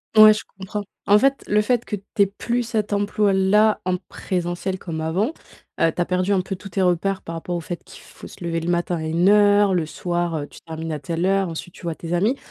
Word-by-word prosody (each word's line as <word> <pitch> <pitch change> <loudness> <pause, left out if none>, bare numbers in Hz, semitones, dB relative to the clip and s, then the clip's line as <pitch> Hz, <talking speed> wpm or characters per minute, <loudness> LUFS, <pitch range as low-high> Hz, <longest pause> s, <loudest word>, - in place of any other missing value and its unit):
Ouais, 215 0 +10
je - - -5 0.2
comprends. 200 +2 -4 0.2
En 205 +1 +7
fait, 275 +4 +2
le 210 +1 +3
fait 240 +1 +1
que 210 - -3
tu 195 - -11 0.2
aies - - +7
plus 235 +4 -2
cet 215 -3 -2
emploi-là 205 +1 +3
en 185 0 0
présentiel 180 0 -3
comme 165 -3 -5
avant, 175 - 0 0.5
heu, 165 0 +4
tu - - -7
as 175 - +2
perdu 185 +2 0
un 190 - +2
peu 190 +1 -5
tous 195 +2 -10
tes 190 +1 0
repères 185 +2 +1
par 165 - -6
rapport 175 +2 -4
au - - -1
fait 175 +1 -6
qu'il - - -14
faut - - -13
se - - -12
lever 165 -1 -1
le 165 - -3
matin 175 0 0
à - - -5
une 165 +4 +1
heure, 205 -1 +5
le 165 -4 0
soir, 175 0 -2
heu, 145 - -4
tu - - -14
termines 160 0 -5
à 150 - -3
telle 165 +5 -2
heure, 195 -1 +2
ensuite, 165 +2 -7
tu - - -15
vois 165 -2 -3
tes 170 0 -5
amis. 210 +10 +2
185 Hz, 250 wpm, -22 LUFS, 170-205 Hz, 0.5 s, Ouais